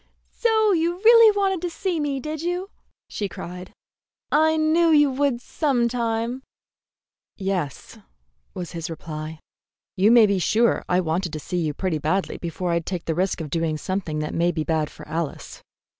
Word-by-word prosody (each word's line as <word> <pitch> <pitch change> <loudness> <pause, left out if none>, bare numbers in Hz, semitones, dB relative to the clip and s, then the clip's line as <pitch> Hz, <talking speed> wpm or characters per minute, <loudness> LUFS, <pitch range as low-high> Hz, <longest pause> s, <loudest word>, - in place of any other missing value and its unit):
"So 440 -3 +2
you 340 -1 +1
really 455 +3 +7
wanted 385 -3 +1
to 355 - -2
see 345 0 -2
me, 285 -2 -1
did 305 +2 -5
you?" 355 +3 -3 0.4
she 205 -2 -4
cried. 180 +1 -8 0.6
"I 315 +1 +4
knew 320 +2 +3
you 295 -3 +5
would 270 -2 0
some 255 -4 0
time." 235 +1 -2 1.0
"Yes," 185 -8 -4 0.6
was 180 -2 -5
his 170 0 -5
reply. 155 -1 -7 0.6
"You 195 +3 +4
may 235 -1 +7
be 200 -2 +1
sure 225 +6 +2
I 180 +1 +3
wanted 175 +1 -2
to 155 - -3
see 180 +4 -4
you 155 -3 -2
pretty 180 -3 -1
badly 170 +6 -1
before 175 +1 -3
I'd 170 -1 -1
take 180 -3 -4
the 165 - 0
risk 180 +1 -1
of 150 -3 -6
doing 165 -2 -1
something 185 -2 -3
that 150 - -4
may 170 +1 +2
be 160 -2 -2
bad 155 -2 0
for - - -13
Alice." 160 -1 -5
195 Hz, 175 wpm, -23 LUFS, -, 1.0 s, really